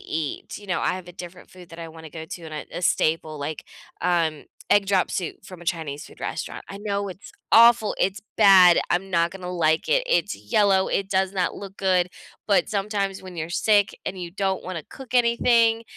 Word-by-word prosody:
eat, 155 +3 -5
you 205 - -14
know, 185 -2 -1
I - - 0
have 185 -1 -8
a - - -10
different 175 0 -11
food 180 -2 -14
that 165 - -11
I 165 - -7
wanna 160 -1 -11
go 160 +1 -7
to 170 +2 -8
and 155 -1 -8 0.2
a - - -4
a - - -7
staple, 155 -2 +1
like, 145 +1 -5 0.4
um, 165 -4 0 0.3
egg 205 -1 +4
drop 195 -2 +2
soup 180 0 -4
from 185 -2 -11
a - - -11
Chinese 155 -4 -3
food - - -16
restaurant, - - -5
I 195 - -7
know 200 -1 -2
it's 190 +1 -11 0.2
awful, 230 -1 +6
it's 195 +1 0 0.2
bad, 190 -4 +8
I'm 190 +2 -1
not 170 -1 +2
gonna 180 -1 -7
like 160 -3 +1
it, - - +3
it's - - +1
yellow, 200 -4 +2
it 195 0 -1
does 190 0 +1
not 185 -2 0
look 195 -1 -9
good, 185 -2 +2 0.4
but, 200 - +2
sometimes, 200 -1 -2
when 185 -2 -10
you're 160 0 -4
sick, 205 +3 +2
and 190 0 -4
you 175 -1 -6
don't 190 +1 -2
wanna 180 -3 -5
cook 265 -3 -11
anything, 235 -1 +3
185 Hz, 210 wpm, -24 LUFS, 170-200 Hz, 0.4 s, bad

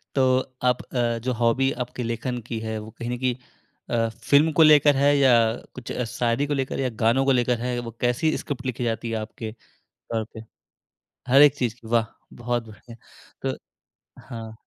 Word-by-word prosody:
तो 135 - +3 0.4
आप 125 0 +2
अ, 120 -2 -1
जो 130 0 0
हॉबी 120 +3 +2
आपके 125 0 -7
लेखन 115 +2 -3
की 115 -2 -3
है 110 0 -4
वो 110 +1 -10
कहीं 120 - -4
न 125 - -2
कहीं 130 -1 0 0.5
अ, 115 -1 +1
फ़िल्म 140 +8 +2
को - - +9
लेकर 150 -2 +6
है 140 +1 +4
या 135 -3 +5 0.4
कुछ 130 -2 -7 0.2
शायरी 120 +4 0
को 145 - -1
लेकर 135 -2 -2
या 130 -1 0
गानों 125 +4 +3
को 135 - +4
लेकर 125 -1 +2
है 125 +1 -2
वो 120 -1 -6
कैसी 125 +6 +1
स्क्रिप्ट 135 -2 -6
लिखी 125 -1 -3
जाती 115 0 -2
है 115 - -1
आपके 110 +1 -6 0.4
तौर 115 -1 -5
पे? 110 - -9 0.9
हर 135 +3 +7
एक 145 -2 +7
चीज़ 120 -5 -1
की, 115 - -14
वाह! 115 -1 +2 0.3
बहुत 120 -1 -3
बढ़िया। 115 +2 -13 0.5
तो - - -2 0.7
हाँ। 115 -1 -8
120 Hz, 190 wpm, -24 LUFS, 115-135 Hz, 0.9 s, को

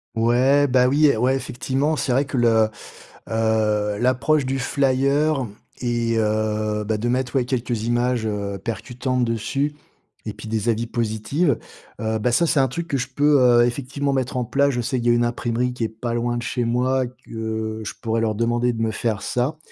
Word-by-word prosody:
Ouais, 125 +5 +3
bah, 125 -1 +4
oui, 145 +1 +4
ouais 125 +4 +2
effectivement 135 +3 -1
c'est 140 - -1
vrai 135 +3 +2
que 140 - -6
le 115 -2 +4 0.6
heu, 110 -2 +1
l'approche 130 +4 +2
du 135 +1 -1
flyer 140 +2 +1 0.4
et 120 -1 0
heu, 110 -1 0
bah, 110 +1 0
de 120 +3 -1
mettre, 125 +1 -1
ouais, 130 - +3
quelques 120 -3 -2
images, 120 0 0
heu, 100 -2 -3
percutantes 125 +3 -2
dessus 115 +6 -1 0.5
et - - -3
puis - - -10
des 110 +1 -1
avis 115 +1 0
positives, 115 +6 0 0.4
heu, 110 0 -1
bah, 120 +3 +1
ça 170 +7 +3
c'est 145 - +3
un 135 - +2
truc 170 +6 -4
que 140 - -2
je 130 +1 -3
peux, 145 +2 +3
heu, 120 -1 +6
effectivement 140 +3 -2
mettre 130 -1 -1
en 125 - 0
place. 140 +4 +2
Je 125 - -2
sais 125 +2 -1
qu'il 120 0 0
y - - +6
a - - +4
une 120 0 +2
imprimerie 120 +1 -1
qui 125 - -4
est 110 - 0
pas 115 +2 -4
loin 120 0 -1
de 120 - -4
chez 125 -1 -1
moi, 125 +2 +1
que 110 -2 -5
je 105 - -5
pourrais 115 0 0
leur 110 -1 +1
demander 120 +2 +1
de 115 -1 -4
me 110 -1 +1
faire 110 -1 -2
ça 130 +6 -1
120 Hz, 200 wpm, -22 LUFS, 110-130 Hz, 0.6 s, heu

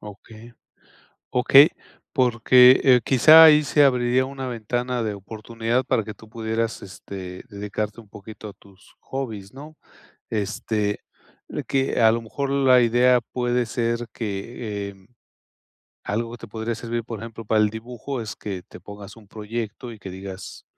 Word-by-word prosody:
Okey 110 +3 -13 0.8
okey, 135 +5 +7 0.4
porque, 125 -1 +5
eh, 125 -2 +6
quizá 155 +6 +8
ahí 150 -1 +7
se 145 0 +3
abriría 125 -1 +2
una 135 -1 -6
ventana 120 +1 -3
de 110 -2 -2
oportunidad 115 +4 -3
para 115 -5 0
que 110 - -7
tú 110 +1 -17
pudieras, 115 0 -3
este, 95 -1 -9
dedicarte 105 +1 -5
un 105 - -23
poquito 105 +1 -11
a - - -10
tus 95 -1 -22
hobbies, 110 -6 -6
¿no? 150 +3 -11 0.6
Este, 105 0 -2 0.7
que 135 -2 0
a 110 -1 +6
lo 115 - -2
mejor 135 +5 -4
la 135 -2 +4
idea 125 +2 +4
puede 125 -1 0
ser 115 +1 -2
que 105 -1 -5
em, 95 -1 -17 1.0
algo 115 +3 -3
que 120 - -9
te 115 - -11
podría 110 +2 -4
servir, 115 0 -4
por 115 -3 -7
ejemplo, 115 0 -9
para 110 +1 +2
el 105 - +2
dibujo 120 +4 -6
es 110 -2 -6
que 95 -4 -6
te - - -13
pongas 100 +1 -11
un 105 -3 -17
proyecto 115 +2 -6
y 110 - -12
que 95 - -8
digas, 95 +1 -9
115 Hz, 155 wpm, -23 LUFS, 105-125 Hz, 1.0 s, quizá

